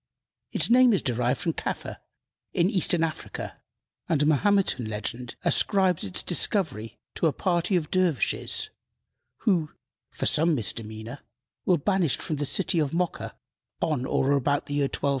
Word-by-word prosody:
Its - - +2
name 245 0 +6
is 195 - +1
derived 125 +1 0
from 165 - -1
Kaffa, - - -5 0.6
in 175 +4 +2
Eastern 175 -3 +2
Africa, 160 -1 -5 0.5
and 150 -3 +2
a - - +2
Mahometan 155 - +2
legend 110 +3 -5
ascribes 190 -4 +2
its 95 -2 -1
discovery 160 - -1 0.2
to 165 - +1
a - - +2
party 180 +3 0
of 160 -4 -1
dervishes, 180 - +1 0.7
who, 175 -8 +1 0.4
for - - -4
some 160 +1 +3
misdemeanor, 110 +2 -4 0.5
were 180 - +4
banished 175 -2 +1
from 155 - -2
the 145 0 -2
city 190 +1 +1
of 150 0 -1
Mocha 180 0 -2 0.4
on 135 -5 -1
or 135 - +1
about 140 +1 +1
the 145 - -6
year 145 -1 +2
1250. 140 - -1
155 Hz, 150 wpm, -26 LUFS, 130-180 Hz, 0.7 s, name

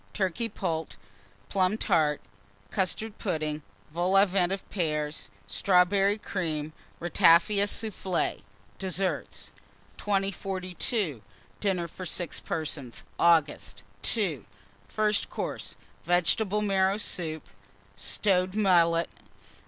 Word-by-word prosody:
Turkey 210 +4 -1
Poult. 165 -6 -3 0.5
Plum 190 +2 +1
Tart. 155 -7 +2 0.5
Custard 205 +3 -1
Pudding. 155 -5 -2 0.3
Vol 175 +4 +2
au 195 - +7
Vent 185 -2 +1
of 195 0 -4
Pears. 150 -5 -1 0.2
Strawberry 195 +2 +3
Cream. 155 -7 -3 0.3
Ratafia 175 +4 +4
Soufflé. 195 -5 -1 0.4
DESSERT. 190 0 -2 0.5
2042. 195 - -1 0.4
DINNER 185 -4 0
FOR 185 +3 -7
6 175 -2 -2
PERSONS 145 -6 -4 0.2
(August). 165 -3 +2 0.3
II. 170 - -1 0.4
FIRST 210 -1 +1
COURSE. - - -4 0.3
Vegetable 195 +4 +2
Marrow 195 -1 +2
Soup. 160 -7 -2 0.5
Stowed 185 - +1
Mullet. 170 -5 +4
185 Hz, 90 wpm, -28 LUFS, 165-200 Hz, 0.5 s, au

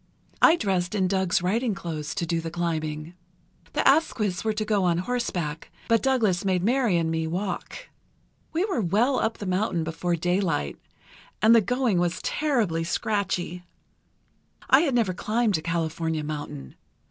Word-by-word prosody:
I 330 - +7
dressed 190 - -1
in 190 -2 +2
Doug's 190 -2 +1
riding 220 +4 0
clothes 160 -4 -5
to 185 -4 -1
do 165 0 -1
the 165 - -4
climbing. 160 -2 -3 0.6
The - - +1
Asquiths 225 - +2
were 220 - +1
to 215 0 -2
go 210 -2 +1
on 175 -2 +2
horseback, 175 -7 -3 0.2
but 230 -1 +3
Douglas 225 -10 +2
made 185 -2 +1
Mary 235 -4 +2
and 165 -1 0
me 160 0 -1
walk. 185 - -4 0.6
"We 335 +4 +1
were 380 - -1
well 220 +9 +2
up 225 - -1
the 205 - -6
mountain 185 -2 0
before 170 +2 -1
daylight, 175 - -1 0.6
and 220 +2 +6
the 230 - +7
going 245 -4 +1
was 175 0 0
terribly 230 - 0
scratchy. 185 -2 -2 1.1
I 265 - +8
had 285 -7 +1
never 220 -6 +2
climbed 215 0 0
a - - -8
California 160 -1 -2
mountain. 145 - -6
185 Hz, 160 wpm, -25 LUFS, 165-225 Hz, 1.1 s, I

